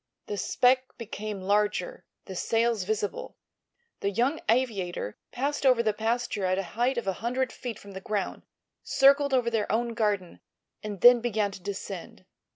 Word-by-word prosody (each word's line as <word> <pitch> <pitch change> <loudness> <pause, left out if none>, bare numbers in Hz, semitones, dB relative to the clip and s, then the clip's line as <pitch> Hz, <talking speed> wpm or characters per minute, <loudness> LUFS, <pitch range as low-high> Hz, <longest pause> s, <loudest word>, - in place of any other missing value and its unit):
The 205 - -4
speck 255 +6 +2
became 215 -3 -5
larger, 210 - 0 0.2
the 190 - -7
sails 225 0 +1
visible. 210 0 -3 0.6
The 200 - 0
young 250 +10 0
aviator 205 - 0
passed 280 +4 -2
over 255 -3 +5
the 215 -2 +2
pasture 225 -1 -1
at 185 0 +1
a 195 - 0
height 245 +3 +1
of 235 - -2
a 195 - 0
hundred 250 +2 0
feet 240 -3 -6
from 200 - -12
the 190 0 -7
ground, 205 0 -3 0.4
circled 275 +1 +4
over 245 -3 +2
their 220 -4 0
own 235 +2 0
garden 205 -5 -1 0.4
and 205 -3 -6
then 245 -1 +8
began 215 -3 0
to 195 - -10
descend. 200 +1 -7
225 Hz, 165 wpm, -28 LUFS, 200-245 Hz, 0.6 s, then